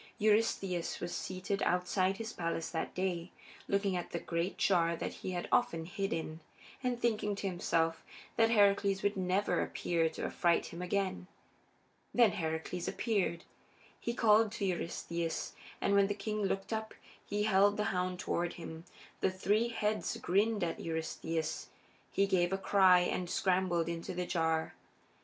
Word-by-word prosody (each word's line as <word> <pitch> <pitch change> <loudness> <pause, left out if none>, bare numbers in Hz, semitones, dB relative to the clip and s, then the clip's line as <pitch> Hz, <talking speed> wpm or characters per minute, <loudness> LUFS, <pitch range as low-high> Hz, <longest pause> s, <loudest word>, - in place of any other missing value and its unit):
Eurystheus 210 -5 +1
was 175 - -4
seated 190 +2 -3
outside 185 +2 +1
his 225 +1 -5
palace 165 -1 -2
that 160 - -3
day, 180 -2 -1 0.4
looking 200 -1 +1
at 175 - -3
the - - -3
great 170 +2 -2
jar 170 -3 +3
that - - -4
he - - -3
had 175 - -3
often 165 -9 +2
hidden 190 0 -2
in, 160 0 -6 0.4
and 250 -1 0
thinking 215 -3 0
to 200 - -5
himself 165 -3 0 0.3
that 225 -1 +4
Heracles 200 -3 +3
would 205 0 +1
never 190 +2 +1
appear 165 -2 0
to 160 - -5
affright 170 -1 +2
him 170 - -6
again. 185 0 -1 0.9
Then 235 -4 +6
Heracles 160 +1 -3
appeared. 195 -7 0 0.6
He 235 - -3
called 220 -2 +5
to 210 -3 -2
Eurystheus, 170 -2 -2 0.3
and 200 - +1
when 200 0 +5
the 205 - -2
king 210 +1 -3
looked 195 +3 -2
up 220 0 -4 0.3
he 205 +1 -1
held 205 0 +4
the 210 - +1
hound 180 0 -1
toward 175 -1 -1
him. 165 -1 -8 0.3
The - - +2
three 205 +5 +1
heads 215 0 -1
grinned 210 0 +1
at 165 - -2
Eurystheus; 160 0 -3 0.4
he 195 - +2
gave 180 -2 +2
a 195 - +1
cry 190 -2 +5
and 180 0 -1
scrambled 180 -3 +1
into 170 +1 -4
the 180 0 -1
jar. 160 -2 0
185 Hz, 155 wpm, -33 LUFS, 170-205 Hz, 0.9 s, Then